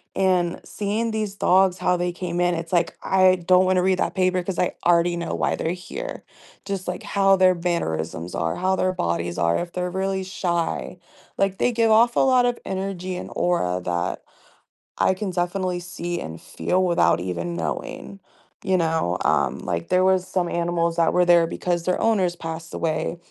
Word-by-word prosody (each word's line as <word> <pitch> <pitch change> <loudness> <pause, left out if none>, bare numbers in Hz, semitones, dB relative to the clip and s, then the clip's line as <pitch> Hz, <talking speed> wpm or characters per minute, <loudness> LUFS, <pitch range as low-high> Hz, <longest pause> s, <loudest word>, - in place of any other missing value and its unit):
and 180 -2 +1
seeing 215 +3 -2
these 215 -2 -3
dogs, 190 -1 +3
how 180 - +1
they 175 0 -1
came 175 0 -3
in, 175 0 +2
it's 165 +1 -6
like, 175 - +1
I 185 -1 +4
don't 185 0 +6
wanna 185 0 +3
read 185 0 +2
that - - 0
paper 185 -1 +1
‘cause 185 0 -4
I 180 - +1
already 170 0 +3
know 170 - -3
why - - 0
they're 160 - -2
here; 180 0 -7 0.4
just, 195 -2 -4
like, 180 0 -3
how 195 -1 +3
their 185 -1 +5
mannerisms 85 - -3
are, 80 0 -1
how 190 +1 +1
their 185 0 +1
bodies 85 - -2
are, 85 0 +2
if 175 0 -5
they're 180 0 -2
really 190 +1 -2
shy. 180 -1 -2 0.4
Like, 195 -1 +1
they 245 - +2
give 230 -1 +2
off 235 +2 +5
a - - +3
lot 255 -2 +4
of 245 -1 0
energy 190 -1 -4
and - - -6
aura 90 - 0
that 85 -1 -2 0.7
I - - +3
can 190 0 -4
definitely 180 0 -1
see 175 0 -5
and 80 +1 -7
feel 185 +1 -1
without 170 - +3
even 85 -1 -3
knowing, 85 - -5 0.5
you 190 -1 +2
know? 160 - 0
Um, - - +1
like, 85 -1 -3
there 185 0 +3
was 185 -1 +2
some 180 -2 -1
animals 170 0 0
that 165 -1 +3
were 180 0 +4
there 170 -1 +5
because 175 0 -2
their 180 +1 0
owners 190 -6 +2
passed 165 -1 -7
away, 160 +1 -2
180 Hz, 190 wpm, -23 LUFS, 170-190 Hz, 0.7 s, don't